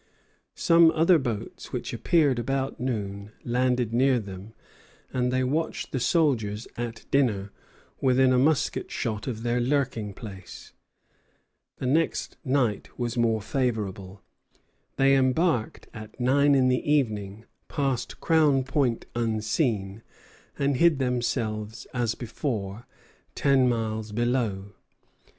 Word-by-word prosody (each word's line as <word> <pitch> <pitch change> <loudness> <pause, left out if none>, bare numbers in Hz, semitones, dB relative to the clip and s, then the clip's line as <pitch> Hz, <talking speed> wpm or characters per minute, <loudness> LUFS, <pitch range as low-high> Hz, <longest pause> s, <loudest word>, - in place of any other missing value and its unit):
Some 165 -1 +5
other 165 +1 +4
boats 120 -6 -5
which - - -4
appeared 145 -7 +2
about 135 +3 -2
noon 105 -5 -4
landed 125 -1 +1
near 130 +1 +3
them, 100 +1 -9 0.6
and 125 -1 0
they 130 0 +1
watched 155 +5 -2
the 130 - -1
soldiers 120 - +1
at 120 -1 -5
dinner, 105 -8 +1 0.5
within 130 0 +4
a 125 - +4
musket 145 +1 +1
shot 105 0 -3
of 115 -3 -4
their 120 0 +1
lurking 125 -6 -1
place. 95 -5 -10 1.0
The - - -5
next 155 +6 0
night 130 -7 0
was 120 -1 -2
more 115 -3 +1
favorable. 105 -6 -3 0.7
They 135 0 +4
embarked 130 -1 +1
at 110 +1 -10
nine 140 +3 +4
in 130 -1 +4
the 130 +3 +1
evening, 110 -6 0 0.2
passed 135 -5 -2
Crown 150 -5 +3
Point 135 -3 0
unseen, 110 - -1 0.6
and 140 -1 +1
hid 170 0 +4
themselves 115 -4 -2
as 120 -3 0
before, 115 -3 -4 0.5
ten 135 -3 +3
miles 110 -2 -2
below. 110 -4 -1
125 Hz, 120 wpm, -26 LUFS, 110-135 Hz, 1.0 s, Some